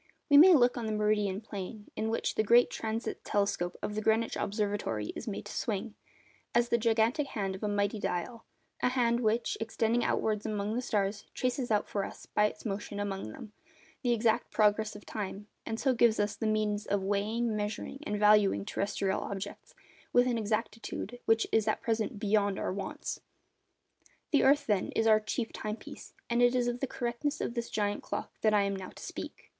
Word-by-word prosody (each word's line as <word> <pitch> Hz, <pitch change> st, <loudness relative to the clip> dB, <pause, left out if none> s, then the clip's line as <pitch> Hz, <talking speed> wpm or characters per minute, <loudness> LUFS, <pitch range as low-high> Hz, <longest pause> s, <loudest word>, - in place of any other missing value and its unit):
We 285 Hz, -, +9 dB
may 350 Hz, +4 st, +9 dB
look 245 Hz, -2 st, +4 dB
on 230 Hz, -2 st, -3 dB
the -, -, -1 dB
meridian 210 Hz, -2 st, +1 dB
plane 205 Hz, 0 st, -7 dB
in 220 Hz, +1 st, -1 dB
which 225 Hz, -, -1 dB
the -, -, +2 dB
great 235 Hz, +3 st, +5 dB
transit 225 Hz, +1 st, -3 dB
telescope 200 Hz, -4 st, 0 dB
of 210 Hz, -, -2 dB
the 215 Hz, -, -2 dB
Greenwich 220 Hz, +1 st, +2 dB
Observatory 205 Hz, -, -2 dB
is -, -, -7 dB
made 205 Hz, -, -4 dB
to -, -, -7 dB
swing, 215 Hz, -1 st, -2 dB, 0.6 s
as 240 Hz, 0 st, +3 dB
the 235 Hz, -, +3 dB
gigantic 230 Hz, +5 st, +2 dB
hand 195 Hz, -6 st, -2 dB
of 190 Hz, -, -8 dB
a 210 Hz, -, -1 dB
mighty 205 Hz, +1 st, 0 dB
dial, 205 Hz, +5 st, -3 dB, 0.4 s
a -, -, +3 dB
hand 240 Hz, -2 st, +2 dB
which, 230 Hz, 0 st, 0 dB
extending 225 Hz, +1 st, +1 dB
outwards 215 Hz, -1 st, 0 dB
among 210 Hz, -1 st, -2 dB
the 245 Hz, -, -1 dB
stars, 205 Hz, -3 st, -1 dB
traces 255 Hz, 0 st, -1 dB
out 210 Hz, -1 st, +2 dB
for 200 Hz, -, -2 dB
us, -, -, -8 dB
by 210 Hz, -, +2 dB
its 210 Hz, -, -9 dB
motion 205 Hz, 0 st, -4 dB
among 195 Hz, -, -3 dB
them, 210 Hz, -, -10 dB, 0.5 s
the 245 Hz, -, +1 dB
exact 225 Hz, -1 st, +2 dB
progress 215 Hz, 0 st, +2 dB
of 205 Hz, -, -11 dB
time, 205 Hz, -1 st, -5 dB, 0.2 s
and 225 Hz, 0 st, -3 dB
so 265 Hz, -2 st, +2 dB
gives 235 Hz, -2 st, +4 dB
us 205 Hz, 0 st, 0 dB
the 225 Hz, -, -2 dB
means 215 Hz, -1 st, 0 dB
of 200 Hz, -1 st, 0 dB
weighing, 215 Hz, +3 st, 0 dB
measuring, 210 Hz, +5 st, -4 dB
and 210 Hz, -, -2 dB
valuing 210 Hz, -, +4 dB
terrestrial 195 Hz, -1 st, -1 dB
objects 200 Hz, 0 st, -6 dB, 0.4 s
with 245 Hz, 0 st, +5 dB
an 250 Hz, -1 st, +1 dB
exactitude 225 Hz, +2 st, -3 dB
which 225 Hz, 0 st, +3 dB
is 220 Hz, -1 st, +2 dB
at 215 Hz, -, +1 dB
present 225 Hz, +1 st, -1 dB
beyond 205 Hz, -1 st, +1 dB
our -, -, -2 dB
wants. 200 Hz, -, -5 dB, 1.1 s
The 285 Hz, -, +5 dB
earth, 280 Hz, +2 st, +4 dB
then, 205 Hz, -4 st, +1 dB
is 225 Hz, -, +1 dB
our 215 Hz, -1 st, +6 dB
'chief 220 Hz, +2 st, -3 dB
time 215 Hz, 0 st, -3 dB
piece,' -, -, -11 dB
and 235 Hz, +1 st, +1 dB
it 245 Hz, +1 st, +5 dB
is 245 Hz, -1 st, +2 dB
of 245 Hz, 0 st, -1 dB
the 270 Hz, -, -1 dB
correctness 245 Hz, +5 st, -2 dB
of -, -, -2 dB
this 235 Hz, -1 st, -3 dB
giant 205 Hz, -1 st, -1 dB
clock -, -, -4 dB
that 215 Hz, -, +4 dB
I 205 Hz, -, +4 dB
am 200 Hz, 0 st, -1 dB
now 190 Hz, -1 st, -6 dB
to -, -, -12 dB
speak. -, -, -8 dB
215 Hz, 200 wpm, -31 LUFS, 205-235 Hz, 1.1 s, We